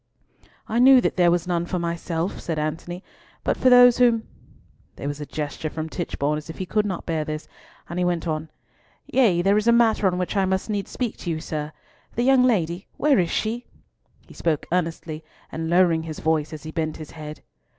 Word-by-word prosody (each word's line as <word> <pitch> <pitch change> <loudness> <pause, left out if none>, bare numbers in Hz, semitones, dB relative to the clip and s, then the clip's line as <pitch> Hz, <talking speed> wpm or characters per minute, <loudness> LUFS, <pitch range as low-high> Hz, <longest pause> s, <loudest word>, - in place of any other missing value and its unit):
"I 230 - 0
knew 260 +1 +8
that - - 0
there 175 -2 +4
was 175 0 +1
none 175 -1 -1
for 180 - -2
myself," 170 +1 -2
said 165 -2 -3
Antony, 165 +4 -4 0.4
"but - - +1
for 255 - +3
those 245 -1 +7
whom—" 235 -3 +3 0.7
There 140 - -6
was 145 +1 -4
a 145 - -6
gesture 155 +1 -4
from 160 +1 -5
Tichborne 150 -3 -2
as 155 - -13
if 160 - -7
he 185 - -3
could 210 +2 0
not 185 -4 -4
bear 160 -2 -1
this, 155 0 -5 0.4
and 170 +2 -4
he - - +2
went 175 -1 -1
on, 155 0 -3 0.6
"Yea, 200 -10 +3
there 200 +2 +4
is 215 - -3
a - - +7
matter 230 -3 +4
on 180 -1 0
which 180 +3 -2
I 195 -1 +3
must 190 +3 -1
needs 200 -2 -2
speak 245 -4 -3
to 175 - -6
you, 160 -1 -1
sir. 150 -1 -4 0.4
The 240 - +1
young 265 0 +5
lady—where 205 - +1
is 175 -2 +1
she?"—he 230 +6 -6
spoke 160 -4 -1
earnestly, 165 -3 -2 0.3
and 160 0 -4
lowering 170 -2 +4
his 160 -1 -6
voice 155 -1 0
as 155 -2 -8
he 155 - -7
bent 155 -2 -2
his 155 -2 -9
head. 155 -1 -9
175 Hz, 205 wpm, -24 LUFS, 160-210 Hz, 0.7 s, knew